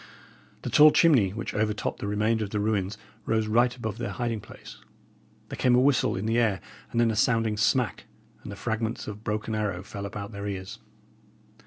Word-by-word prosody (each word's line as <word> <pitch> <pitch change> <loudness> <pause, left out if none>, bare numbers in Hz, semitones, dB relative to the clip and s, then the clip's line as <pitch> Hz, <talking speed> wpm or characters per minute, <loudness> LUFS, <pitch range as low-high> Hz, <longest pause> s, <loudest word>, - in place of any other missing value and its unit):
The 125 - -4
tall 150 +6 +8
chimney 145 - +4
which 105 +4 -5
over 105 0 0
topped - - -4
the - - -4
remainder 110 +2 +1
of 100 - -5
the 105 - -2
ruins 100 -1 -1 0.3
rose 110 -1 +1
right 120 +3 +2
above 110 -2 -5
their 120 - -3
hiding 120 -3 -3
place. - - -12 0.7
There - - -6
came 125 -1 +3
a - - +5
whistle 135 +1 +3
in 95 +2 -3
the 115 +2 +2
air, 105 -5 +2 0.3
and 115 - -1
then 115 -1 +3
a - - -3
sounding 115 0 +2
smack, 110 0 +1 0.4
and - - -8
the - - -6
fragments 110 +2 -3
of 105 -1 -5
a - - -17
broken 110 +1 -3
arrow 105 -4 -2
fell 100 0 -6
about 100 0 -7
their 100 -1 -6
ears. 95 -2 -6
110 Hz, 205 wpm, -27 LUFS, 105-115 Hz, 0.7 s, tall